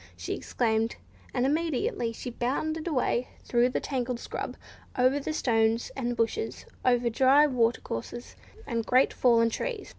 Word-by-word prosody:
she 85 - -4
exclaimed; 225 -1 0 0.4
and 250 0 0
immediately 285 -5 0
she 245 +2 -6
bounded 310 +7 -2
away 255 -4 0 0.2
through 240 +1 +2
the - - -1
tangled 250 -3 -2
scrub, - - -5 0.4
over 260 +3 +3
stones 225 -5 +1
and 245 -2 -2
bushes, 430 - -2 0.2
over 245 -1 +3
dry 265 +5 +5
water 240 -4 +1
courses 175 - -6 0.3
and 230 -3 -1
great 255 +1 +4
fallen 230 -2 +4
trees. 455 - -4
245 Hz, 140 wpm, -28 LUFS, 230-270 Hz, 0.4 s, dry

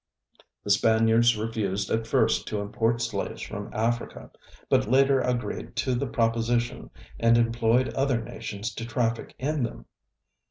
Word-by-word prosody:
The 100 - -1
Spaniards 115 +2 +4
refused 105 -3 -2
at 110 0 0
first 130 -5 +2
to 105 - -2
import 115 +3 0
slaves 115 -4 -3
from - - -6
Africa, 115 +2 -2 0.4
but - - +2
later 135 +1 +4
agreed 125 -1 -3
to 130 - 0
the 125 +3 -1
proposition 115 0 0 0.3
and 115 0 +4
employed 115 +2 +2
other 135 -3 +1
nations 110 -2 -6
to 115 - -6
traffic 115 -1 -2
in 150 +2 -1
them. 120 - -4
115 Hz, 135 wpm, -26 LUFS, 110-120 Hz, 0.4 s, Spaniards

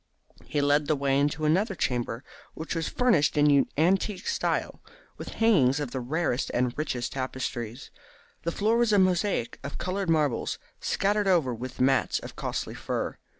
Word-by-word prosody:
He 150 - -1
led 145 +1 +2
the 155 - +2
way 140 -1 +1
into 145 +2 0
another 190 +7 +2
chamber, 120 -4 -2 0.3
which 160 - -5
was 165 -2 -2
furnished 170 -14 +2
in 145 -2 +5
antique 185 +4 +1
style, - - -1 0.4
with - - -7
hangings 150 - +3
of 145 -5 -4
the 130 - -3
rarest 140 +1 -1
and 125 0 0
richest 130 -6 -3
tapestry. 130 -3 -4 0.6
The 170 - -2
floor 215 +6 +1
was 235 -2 +3
a 205 - +4
mosaic 185 - +1
of 140 - -6
coloured 185 0 -2
marbles, 150 -6 +1 0.2
scattered 205 +1 0
over 165 -10 +3
with 125 +2 -7
mats 135 +1 +2
of - - -8
costly - - -4
fur. - - -4
150 Hz, 160 wpm, -27 LUFS, 130-185 Hz, 0.6 s, in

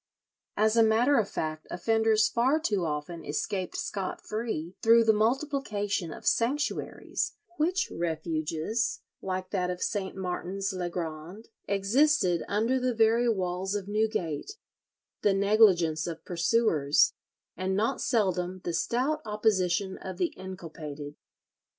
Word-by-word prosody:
As 215 +1 +3
a 230 - +6
matter 230 +5 +4
of 205 - 0
fact 155 0 -4
offenders 220 +3 +2
far 255 +8 +2
too 205 - 0
often 155 +2 -4
escaped 185 +5 -3
scot 195 -2 -3
free 215 -6 -4
through 230 +1 +6
the 220 -1 +5
multiplication 215 - 0
of - - -10
sanctuaries—which 305 +6 -1
refuges, 165 +5 -2 0.2
like 185 -1 -4
that 180 -3 0
of 180 0 -3
St. 195 -3 -2
Martin's 190 +1 -3
le 180 -1 -2
Grand, 170 +4 -6 0.2
existed 200 - +3
under 225 +6 +1
the 250 -1 0
very 230 +2 +4
walls 190 -1 -1
of 200 -2 -3
Newgate—the 210 - -3
negligence 195 -6 +4
of 165 -1 -6
pursuers, 170 -5 +3 0.4
and 190 +1 -1
not 225 +6 0
seldom 185 -4 0
the 175 - -2
stout 260 - 0
opposition 200 -4 0
of 185 -1 -7
the 180 -2 0
inculpated. 155 -6 -8
195 Hz, 120 wpm, -28 LUFS, 175-225 Hz, 0.4 s, a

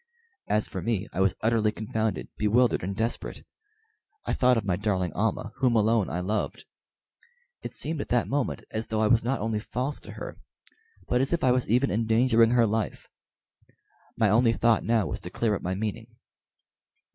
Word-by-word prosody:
As 105 0 +1
for 95 - -5
me, 105 -1 -1
I 95 - -1
was 95 -1 +2
utterly 110 -1 +2
confounded, 110 -1 -2
bewildered, 115 +3 +2
and 95 +2 -4
desperate. 115 +3 -3 0.8
I - - -1
thought 125 -1 +3
of 110 - -2
my 95 -3 +1
darling 95 -4 -1
Almah, 105 +1 -1
whom 125 -3 +2
alone 110 -2 +2
I 90 - -2
loved. 105 +4 -2 1.0
It - - -7
seemed 160 -2 -2
at - - -6
that 120 -1 +2
moment 140 0 -2
as 110 0 -3
though 110 0 -1
I - - +4
was 115 +1 +3
not 130 0 -1
only 110 0 -1
false 130 +6 -3
to - - -11
her, - - -8 0.7
but 125 +1 +2
as 135 +5 +1
if 170 - 0
I 130 - +4
was 125 0 0
even 125 +5 +3
endangering 115 +1 +3
her 120 -1 +4
life. 110 -1 -2 1.1
My 110 - +3
only 115 +1 +4
thought 115 -1 +2
now 115 -3 +2
was - - -4
to 90 - -8
clear 110 +3 0
up 100 - -2
my 95 +1 -2
meaning. 110 +2 -4
110 Hz, 185 wpm, -27 LUFS, 105-120 Hz, 1.1 s, I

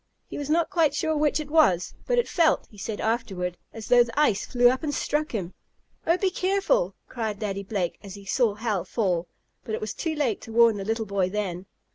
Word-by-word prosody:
He - - -7
was 290 0 -5
not 330 +1 +2
quite 315 -5 +2
sure 315 +1 0
which 300 0 +2
it 295 -1 -6
was, 190 - +3
but - - +2
it 485 - +2
felt, 330 -3 +2
he 210 - -16
said 210 +1 -4
afterward, 200 -6 -1 0.2
as 220 -2 -8
though 245 -1 +6
the 235 +4 -4
ice 215 -9 +2
flew 245 -1 +4
up 255 +1 +2
and 305 -2 -2
struck 300 +1 -1
him. 190 -6 -4 0.5
"Oh, 335 +2 +4
be 380 0 +1
careful!" 395 +7 +1
cried 220 -4 -3
Daddy 200 -2 -3
Blake, 195 -3 -3
as 200 -2 -9
he 200 -1 -12
saw 220 0 +1
Hal 210 -5 -1
fall. 180 -6 -1 0.4
But 220 - -3
it - - -6
was 215 0 -3
too 325 -2 -3
late 260 -9 0
to 225 - -10
warn 230 -1 +5
the 195 - -5
little 225 +1 -1
boy 195 -2 0
then. 190 -2 -3
225 Hz, 225 wpm, -26 LUFS, 200-300 Hz, 0.5 s, though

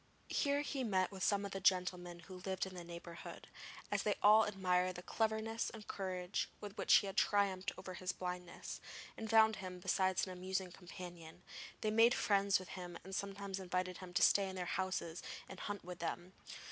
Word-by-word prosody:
Here 285 0 +2
he 280 -2 -2
met 190 -5 +2
with 190 -1 -8
some 200 -1 +2
of 200 - -5
the 195 - -3
gentlemen 180 -2 +1
who 185 +2 -10
lived 190 -1 -1
in 190 - -8
the 180 -1 -7
neighbourhood, 170 0 -8
and - - -21 0.4
as - - +2
they 210 - +1
all 215 +1 +8
admired 185 -2 +1
the 180 - -7
cleverness 220 +1 0
and 220 -2 -10
courage 185 -1 -2
with 205 -1 -7
which - - 0
he - - +6
had 195 - -4
triumphed 200 -2 +2
over 185 - -7
his 180 +1 -2
blindness, 180 -1 -5 0.3
and 220 - -5
found 220 -1 +6
him 185 -1 -6
besides 185 +1 +2
an 185 - -7
amusing 185 0 -2
companion, 175 -2 -10 0.4
they 215 - +1
made 230 +3 +6
friends 200 -1 +3
with 185 - -9
him 180 -2 -6
and 190 - -9
sometimes 200 0 -3
invited 180 -1 -2
him 185 -1 -8
to 180 - +4
stay 195 -1 +5
in 190 - -6
their 180 -1 -2
houses 180 -2 -2 0.3
and - - -9
hunt 205 -1 -4
with 180 -1 -7
them. 175 +2 -4
190 Hz, 195 wpm, -37 LUFS, 180-200 Hz, 0.4 s, all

